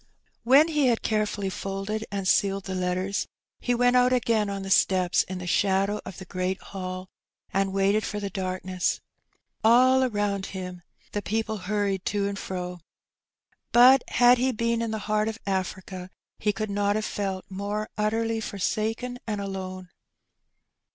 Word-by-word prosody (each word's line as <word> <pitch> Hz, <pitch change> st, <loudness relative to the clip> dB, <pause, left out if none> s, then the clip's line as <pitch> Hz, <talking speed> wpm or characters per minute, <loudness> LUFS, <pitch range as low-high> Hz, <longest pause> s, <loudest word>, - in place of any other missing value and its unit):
When 275 Hz, +7 st, +6 dB
he 300 Hz, -4 st, +2 dB
had 235 Hz, -2 st, +1 dB
carefully 210 Hz, -2 st, 0 dB
folded 195 Hz, +3 st, -4 dB
and 195 Hz, -2 st, -2 dB
sealed 195 Hz, 0 st, +2 dB
the 190 Hz, -, -5 dB
letters, 185 Hz, +2 st, -1 dB, 0.3 s
he 245 Hz, -, 0 dB
went 245 Hz, +1 st, +3 dB
out 250 Hz, 0 st, +5 dB
again 230 Hz, -4 st, +2 dB
on 195 Hz, -1 st, -4 dB
the 195 Hz, -, -5 dB
steps 185 Hz, -2 st, +4 dB
in 185 Hz, -, -5 dB
the 180 Hz, -, -6 dB
shadow 195 Hz, +3 st, +1 dB
of 190 Hz, -, -8 dB
the 190 Hz, -, -8 dB
great 185 Hz, +1 st, -2 dB
Hall, 185 Hz, -1 st, -6 dB, 0.5 s
and 195 Hz, 0 st, +1 dB
waited 195 Hz, +2 st, +2 dB
for 210 Hz, -, -3 dB
the 200 Hz, -1 st, -4 dB
darkness. 185 Hz, -1 st, -2 dB, 0.6 s
All 255 Hz, +3 st, +6 dB
around 205 Hz, -5 st, -1 dB
him 180 Hz, -1 st, -6 dB, 0.3 s
the 205 Hz, -, -2 dB
people 220 Hz, +1 st, -2 dB
hurried 200 Hz, -3 st, 0 dB
to 205 Hz, -1 st, 0 dB
and 200 Hz, -, -3 dB
fto. 180 Hz, -1 st, -5 dB, 0.9 s
But 250 Hz, +2 st, +7 dB
had 245 Hz, 0 st, +5 dB
he 260 Hz, +1 st, +2 dB
been 230 Hz, 0 st, 0 dB
in 230 Hz, -, -1 dB
the 220 Hz, -, -2 dB
heart 215 Hz, 0 st, +1 dB
of 220 Hz, -1 st, -3 dB
Africa 190 Hz, -1 st, -3 dB, 0.3 s
he 210 Hz, -, +2 dB
could 215 Hz, 0 st, -4 dB
not 205 Hz, 0 st, +1 dB
have 215 Hz, 0 st, -1 dB
felt 195 Hz, -2 st, -3 dB
more 205 Hz, +2 st, -3 dB
utterly 225 Hz, +1 st, 0 dB
forsaken 220 Hz, +5 st, -2 dB
and 210 Hz, -2 st, -2 dB
alone. 185 Hz, -2 st, -5 dB
200 Hz, 160 wpm, -26 LUFS, 190-220 Hz, 0.9 s, But